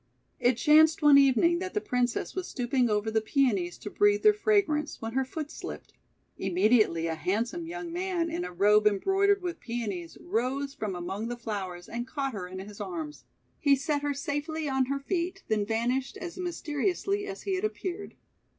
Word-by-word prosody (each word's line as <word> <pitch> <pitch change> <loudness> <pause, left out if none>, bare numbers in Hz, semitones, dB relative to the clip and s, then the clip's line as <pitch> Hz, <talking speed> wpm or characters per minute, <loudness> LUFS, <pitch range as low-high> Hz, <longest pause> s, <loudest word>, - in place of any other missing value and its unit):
It 245 -1 +3
chanced 315 +2 +5
one 290 -1 +8
evening 280 +6 +4
that 375 +2 -5
the - - +3
Princess 250 - -1
was 370 -1 -4
stooping 245 -1 0
over 210 +1 0
the 220 0 +2
Peonies 215 - +1
to 205 - -8
breathe 415 0 +3
their 425 -1 +7
fra 420 0 +3
grance, 300 -3 -3
when 225 0 -5
her 265 +1 +2
foot 295 +3 -6
slipped. - - -8 0.5
Immediately 190 -2 +3
a 165 - -1
handsome 225 - -2
young 340 0 -6
man, 355 -1 -1
in 335 - -2
a 180 - -5
robe 210 +4 +4
embroidered 390 - +2
with 350 -1 -4
Peonies, 205 -8 -5
rose 255 +8 -2
from 215 -9 -4
among 190 +5 -4
the 240 0 -4
flowers 190 -6 -5
and 240 +1 -4
caught 275 -1 -3
her 185 -4 -5
in 185 +1 -8
his 200 +2 -8
arms. 320 -5 -6 0.3
He 280 -1 +5
set 290 +1 -1
her 290 -1 -1
safely 295 +3 -3
on 265 -1 +1
her 275 +2 -1
feet, 355 +6 -3
then 210 -2 +1
vanished 245 +4 -1
as 345 -1 -7
mysteriously 365 +3 -2
as 390 0 -7
he 390 - -1
had 375 +1 -1
appeared. 400 -2 -4
275 Hz, 185 wpm, -28 LUFS, 215-340 Hz, 0.5 s, one